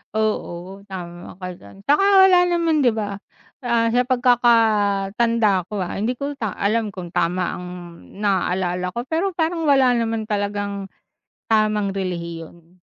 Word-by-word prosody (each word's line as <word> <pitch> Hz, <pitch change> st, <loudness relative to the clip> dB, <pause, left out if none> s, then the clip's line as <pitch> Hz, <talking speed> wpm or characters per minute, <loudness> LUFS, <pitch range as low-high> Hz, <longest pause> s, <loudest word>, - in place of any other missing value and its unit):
Oo, 195 Hz, -3 st, -3 dB
tama 175 Hz, 0 st, -8 dB
ka 185 Hz, -, -5 dB
diyan, 100 Hz, -10 st, -15 dB
'tsaka 295 Hz, +7 st, +4 dB, 0.2 s
wala 370 Hz, -1 st, +5 dB
naman 335 Hz, -4 st, +1 dB
'di 245 Hz, -, +4 dB
ba, 210 Hz, -2 st, -3 dB, 0.5 s
ah, 235 Hz, -2 st, +2 dB
sa 250 Hz, -, +4 dB
pagkakatanda 230 Hz, -4 st, +2 dB
ko, 210 Hz, -, -3 dB
ah, 180 Hz, -2 st, -3 dB
hindi 235 Hz, +5 st, -2 dB
ko 285 Hz, +1 st, -3 dB
lang 220 Hz, -6 st, -3 dB
alam 220 Hz, +4 st, 0 dB
kung 175 Hz, -3 st, -9 dB
tama 175 Hz, +1 st, 0 dB
ang 180 Hz, -, -8 dB, 0.5 s
naalala 180 Hz, -2 st, 0 dB
ko 240 Hz, +6 st, -5 dB
pero 340 Hz, +6 st, 0 dB
parang 330 Hz, 0 st, -1 dB
wala 270 Hz, -4 st, +4 dB
naman 225 Hz, -2 st, -1 dB
talagang 205 Hz, -2 st, -3 dB, 0.6 s
tamang 215 Hz, -2 st, +2 dB
relihiyon. 170 Hz, -2 st, -6 dB
210 Hz, 140 wpm, -21 LUFS, 185-240 Hz, 0.6 s, wala